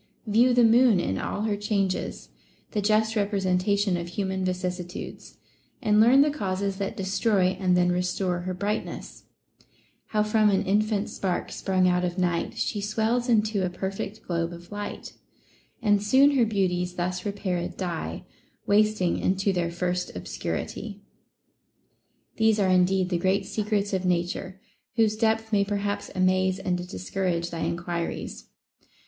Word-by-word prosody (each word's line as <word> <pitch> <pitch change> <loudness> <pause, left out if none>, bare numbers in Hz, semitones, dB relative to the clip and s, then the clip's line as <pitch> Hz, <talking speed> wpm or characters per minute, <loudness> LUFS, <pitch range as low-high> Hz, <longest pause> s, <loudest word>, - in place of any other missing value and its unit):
View 235 +4 +4
the 245 - +5
moon 230 -2 +5
in 95 - -1
all 205 - -3
her 215 -2 0
changes, 200 -2 -2 0.4
the 210 - -1
just 220 +2 +2
representation 200 -1 +1
of 170 0 -5
human 190 +1 -2
vicissitudes, 180 0 -5 0.4
and 210 0 +3
learn 250 +5 +7
the 295 +1 +3
causes 195 -6 -2
that 195 -1 -3
destroy 195 0 +2
and 180 -2 +3
then 180 0 +3
restore 180 0 -1
her 185 +1 -4
brightness: 205 +3 -4 0.4
— - - -37
How 210 -1 +1
from 215 0 +3
an 200 0 +1
infant 210 +1 +1
spark 185 -2 -2
sprung 185 -1 +1
out 180 0 +2
of 175 +1 -2
night, 175 -2 -1
She 205 - -1
swells 220 +4 0
into 215 -3 +2
a 180 - 0
perfect 195 +3 -5
glohe 170 -1 -2
of 170 +2 -12
light; 205 0 -6 0.7
And 205 -2 +3
soon 265 +7 +5
her 260 -5 +3
beauties 180 -4 0
thus 180 +1 -2
repaired 190 -4 -3
die, 165 - -4 0.4
Wasting 210 -3 +2
into 195 +1 +1
their 175 -2 0
first 180 +1 -2
obscurity.* 205 -2 -5 1.4
These 220 -1 +3
are 195 -2 +2
indeed 185 0 +3
the 175 -2 0
great 190 +2 +1
secrets 205 0 -1
of 190 -1 0
Nature, 180 +2 -1 0.4
whose 220 -3 +3
depth 220 0 0
may 200 -1 +4
perhaps 205 0 -2
amaze 185 0 +2
and 185 -2 -1
discourage 170 - -2
thy 165 - -5
enquiries. 170 0 -3
195 Hz, 145 wpm, -26 LUFS, 180-210 Hz, 1.4 s, learn